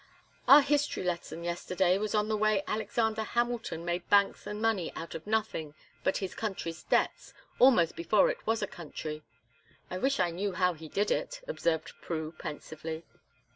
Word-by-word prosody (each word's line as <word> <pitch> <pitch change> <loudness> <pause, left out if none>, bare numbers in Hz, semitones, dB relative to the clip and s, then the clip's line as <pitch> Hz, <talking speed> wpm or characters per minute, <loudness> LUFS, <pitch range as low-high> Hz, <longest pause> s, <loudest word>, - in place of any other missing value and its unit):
"Our 285 +1 +10
history 290 -5 +1
lesson 170 -1 -3
yesterday 180 +2 +1
was 215 0 -1
on 210 0 +2
the 215 - +1
way 215 -2 +2
Alexander 220 +1 0
Hamilton 235 -6 -1
made 175 0 -2
banks 200 0 +3
and 210 0 -4
money 220 -6 +1
out 165 - -6
of 165 +4 -7
nothing 210 -9 -1 0.3
but 190 - +2
his 190 -2 -4
country's 170 -7 -4
debts, - - 0 0.2
almost 235 -11 +6
before 175 +5 +3
it - - -10
was 225 -1 +1
a - - 0
country; 155 -3 -6 0.7
I 185 - -3
wish 275 +4 +1
I 175 -2 +2
knew 195 +3 -2
how 180 0 +2
he 160 -1 -10
did 205 +5 0
it," - - -1
observed 165 - -1
Prue, 160 -2 -3
pensively. 160 +1 -6
190 Hz, 170 wpm, -30 LUFS, 170-220 Hz, 0.7 s, Our